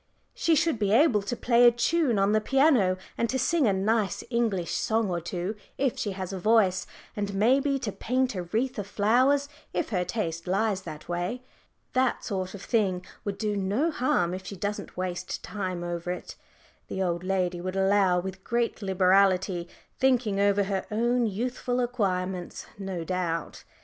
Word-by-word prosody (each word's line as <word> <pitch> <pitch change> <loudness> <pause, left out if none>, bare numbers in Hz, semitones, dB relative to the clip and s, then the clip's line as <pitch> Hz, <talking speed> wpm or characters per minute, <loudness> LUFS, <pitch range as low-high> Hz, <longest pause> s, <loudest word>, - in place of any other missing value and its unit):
"She 330 - +2
should 310 -5 +1
be 205 -2 +1
able 230 -2 +5
to 205 +5 -3
play 240 0 +5
a - - +8
tune 245 +1 +1
on 195 +1 +3
the 215 0 +3
piano, 260 -8 +3 0.2
and 235 - +1
to 260 - 0
sing 285 +1 +2
a - - +4
nice 200 +1 0
English 220 -7 0
song 220 -3 0
or 170 -1 -1
two 175 +5 -3 0.2
if 270 -3 +1
she 205 - -2
has 190 0 -5
a 190 - -4
voice, 205 -2 +3 0.3
and 205 -2 -3
maybe 270 +7 +3
to 230 -6 -3
paint 255 +4 0
a 185 - -3
wreath 225 +8 -2
of 200 - -4
flowers 255 +8 +3 0.3
if - - -1
her 180 -5 0
taste 170 -5 -3
lies 195 +1 +1
that 155 -4 -9
way. 175 +9 -3 0.5
That 255 -1 +1
sort 190 -1 -3
of 195 - -9
thing 190 -6 0 0.2
would 200 -1 -3
do 210 -2 -1
no 205 - 0
harm 180 - +1
if 190 +1 -5
she 200 - -7
doesn't 205 +1 -4
waste 180 -1 -4
time 185 -4 -4
over 175 0 -4
it," 180 - -6 0.5
the 190 - -2
old 175 -1 -1
lady 185 -2 -1
would 185 +1 -4
allow, 195 -2 +3
with 190 +1 -6
great 235 -1 -1
liberality, 190 -2 +3 0.3
thinking 245 -6 +2
over 200 0 +3
her 195 -1 -2
own 235 +2 +1
youthful 245 +4 -2
acquirements 190 -7 -2
no 190 -4 -4
doubt. 170 -2 -3
200 Hz, 175 wpm, -27 LUFS, 185-235 Hz, 0.5 s, a